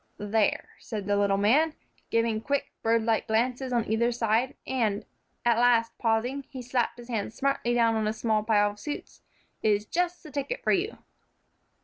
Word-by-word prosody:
"There," 210 +1 0
said 210 -4 -5
the 205 0 +1
little 200 -1 +2
man, 285 +11 +3 0.3
giving 230 -1 +1
quick, 280 +3 -1
birdlike 225 0 +1
glances 250 +4 0
on 235 -2 +1
either 235 +3 +2
side, 235 +2 +1
and, 220 -6 0 0.4
at 235 -1 +4
last 230 -1 +3
pausing, 245 +4 0
he 260 -2 -7
slapped 245 -1 -1
his 240 -1 -11
hand 220 -3 -3
smartly 275 -3 0
down 230 -1 +4
on 220 -1 0
a 215 - 0
small 220 -1 +1
pile 210 -1 +3
of 205 - -15
suits, 295 +4 -6 0.4
"is 210 -1 +2
just 355 +6 -1
the 305 - -11
ticket 285 - -3
for - - +2
you." 395 +4 0
230 Hz, 170 wpm, -27 LUFS, 215-255 Hz, 0.4 s, at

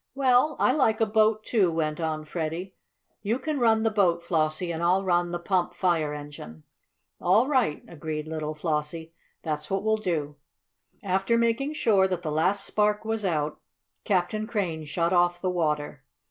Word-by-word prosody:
"Well, 270 +2 +3
I - - +3
like 225 -7 +2
a 225 - +4
boat, 215 0 +2
too," 195 -7 +2
went 155 -1 -1
on 155 -1 -2
Freddie. 165 +4 -4 0.5
"You 220 +4 0
can 295 +2 -3
run 225 -2 +3
the 225 - +2
boat, 175 -5 +2
Flossie, 160 +1 0
and 165 0 -4
I'll 180 +3 +2
run 175 -2 +1
the 175 - -2
pump 180 0 -1
fire 165 -5 +1
engine." 145 - -9 0.6
"All 200 +7 +4
right," 255 - +1
agreed 155 -1 -5
little 155 -1 -4
Flossie. 160 +1 -3 0.3
"That's 150 -1 -3
what 195 0 -1
we'll 220 0 +2
do." 155 -8 -3 0.7
After 195 +4 +1
making 235 +5 +1
sure 205 -10 +3
that 185 -2 -3
the 155 - -2
last 180 +6 +1
spark 210 0 0
was 225 -1 -1
out, 155 -5 -1 0.4
Captain 210 +3 0
Crane 180 -9 -2
shut 170 +4 0
off 175 0 +3
the 185 0 -1
water. 150 -5 -2
175 Hz, 170 wpm, -26 LUFS, 155-215 Hz, 0.7 s, a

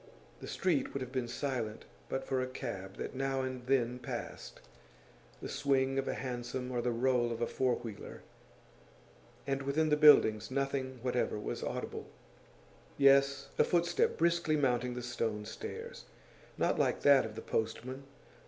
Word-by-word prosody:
The - - -8
street 175 -7 0
would 140 - -2
have 125 - -8
been 130 -3 -1
silent 120 -3 -3 0.2
but 135 - -2
for 130 -1 0
a 130 - -1
cab 95 -7 -6
that - - -5
now 135 0 -1
and 130 -1 -5
then 125 -2 +1
passed - - -6 0.8
the - - -3
swing 135 -1 +1
of 135 - -2
a - - -1
hansom 125 0 -4
or 120 -1 0
the 125 - 0
roll 120 0 +2
of 115 - -3
a 120 - +1
four 125 0 +1
wheeler 110 -3 -8 1.2
and 135 0 -1
within 145 +3 +1
the 150 - +4
buildings 110 -8 +6
nothing 135 -1 -2
whatever 125 -3 0
was 105 - -4
audible. - - -4 0.9
Yes, 140 0 +4
a - - +8
footstep, 175 0 +1
briskly 170 -2 +2
mounting 125 -3 +1
the 125 - -5
stone 115 -3 -2
stairs. 110 - -7 0.5
Not - - +1
like - - +1
that 140 -2 +6
of 110 -1 -6
the 115 - -6
postman. 125 +5 -3
130 Hz, 160 wpm, -33 LUFS, 120-135 Hz, 1.2 s, a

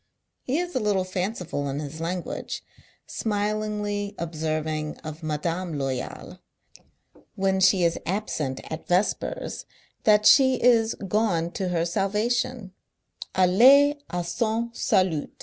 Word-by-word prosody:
He 265 +4 -1
is 355 +1 -2
a 260 - 0
little 205 -4 +1
fanciful 185 -6 -3
in 135 +1 -3
his 150 +2 -6
language: 175 +1 -4 0.4
smilingly 210 -1 -2
observing 155 -2 -3
of 155 0 -7
Madame 165 +2 -2
Loyal, 135 -2 -4 1.0
when 190 0 +1
she 190 -1 +4
is 170 0 +1
absent 160 -8 -2
at 160 - -6
vespers, 205 - -1 0.4
that 210 -1 +4
she 260 -2 +7
is 230 -2 +3
"gone 180 -5 +1
to 190 - -3
her 170 -1 0
salvation" 210 +4 -1 0.3
— - - -13
allee 265 +11 +6
a 175 0 -2
son 230 +5 -1
salut. 185 -9 +1
190 Hz, 120 wpm, -25 LUFS, 165-215 Hz, 1.0 s, she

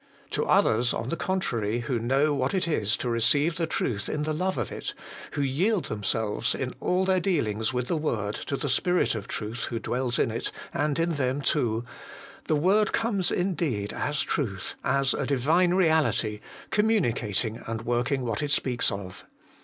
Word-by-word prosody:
To - - 0
others, 120 +3 +3
on 115 - -3
the - - 0
contrary, 120 - -1
who 120 0 -1
know 135 +6 +2
what 140 +3 0
it 185 - +1
is 110 -9 +1
to - - -3
receive 140 +8 +2
the 165 -2 0
truth 105 -10 -2
in 150 - -1
the 155 +1 -1
love 185 +1 -1
of 120 - -2
it, - - -5 0.4
who 145 - 0
yield 175 +9 +1
themselves, 105 0 -1
in 130 -1 -3
all 185 +1 +1
their 190 -1 +3
dealings 115 - 0
with 125 -1 -2
the 170 - 0
word, 110 -10 -1
to 140 - -1
the 145 - -2
Spirit 180 +7 +2
of 110 -3 -5
Truth 110 +2 -4
who 120 - -3
dwells 125 +2 -1
in - - +2
it 115 - -3 0.2
and 150 -1 0
in 165 0 +1
them 130 0 0
too, 120 -6 0 0.6
the 155 - +3
word 195 +8 +3
comes 205 -5 +1
indeed 160 - -1
as 150 0 -1
Truth, 100 - -2
as 135 0 +2
a - - -2
Divine 160 +7 +3
reality, 140 - +2 0.3
communicating 120 - +1
and 115 0 -3
working 125 +3 0
what 115 +4 -1
it 145 - -1
speaks 130 -3 +1
of. 95 -2 -7
130 Hz, 180 wpm, -27 LUFS, 115-165 Hz, 0.6 s, others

